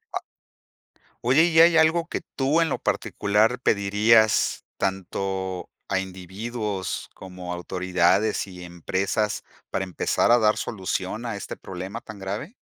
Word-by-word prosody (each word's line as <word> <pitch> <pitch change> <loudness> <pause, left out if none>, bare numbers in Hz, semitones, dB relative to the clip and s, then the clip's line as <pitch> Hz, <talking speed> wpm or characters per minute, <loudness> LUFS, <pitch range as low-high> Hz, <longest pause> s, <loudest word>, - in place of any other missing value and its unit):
A - - +1 1.0
Oye, 135 +7 +5
¿y 165 -1 +4
hay 165 0 +7
algo 160 +1 +4
que - - -3 0.2
tú 145 +5 +3
en 165 - +2
lo - - -2
particular 110 +5 +1
pedirías 110 0 +3
tanto 95 -1 -3 0.2
a 95 - +2
individuos 95 +2 -4
como 90 -1 -8
a - - -2
autoridades 95 +3 +1
y 90 -1 -10
empresas 95 +5 -1 0.3
para 95 - -1
empezar 95 +4 +1
a 120 - +6
dar 110 -1 +4
solución 95 +2 -3
a 115 -3 -3
este 100 - -6
problema 95 +4 -6
tan 110 -3 -11
grave? 100 - -5
100 Hz, 135 wpm, -25 LUFS, 95-115 Hz, 1.0 s, hay